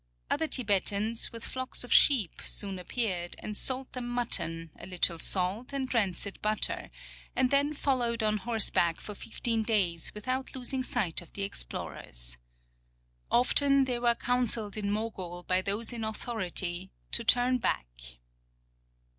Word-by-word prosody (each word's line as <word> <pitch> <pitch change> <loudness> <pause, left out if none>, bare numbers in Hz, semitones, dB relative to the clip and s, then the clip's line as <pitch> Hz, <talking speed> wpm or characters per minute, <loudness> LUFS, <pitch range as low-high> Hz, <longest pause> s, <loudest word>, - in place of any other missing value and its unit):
Other 320 +2 +1
Tibetans, 210 - +1
with 230 -1 -6
flocks 260 -1 -2
of 245 - -1
sheep, 235 - +4
soon 195 -2 -1
appeared 180 -3 -2
and 210 - -6
sold 260 +3 0
them 250 -1 -5
mutton, 170 -9 0
a - - -8
little 175 -2 +1
salt, 195 - +1
and 265 -2 -3
rancid 200 -3 -1
butter, 215 0 +1 0.5
and 255 -1 +2
then 285 +2 +2
folloAved 240 -5 0
on 215 0 +1
horseback 210 -6 +2
for 210 - -6
fifteen 225 +2 -1
days 190 -7 +2
without 255 +6 -3
losing 260 +1 -2
sight 215 -11 -1
of 175 - -16
the 200 - -2
explorers. - - -3 0.9
Often 275 +3 +4
they' 250 -2 -2
were 240 -1 +2
counseled 235 -4 +1
in 210 -2 -3
Mogul 195 -5 -4
by 185 +1 +1
those 210 +5 0
in 230 -2 -5
authority 190 -5 -2 0.2
to 235 - +5
turn 245 +2 +3
back. 65 - -1
220 Hz, 140 wpm, -29 LUFS, 185-245 Hz, 0.9 s, to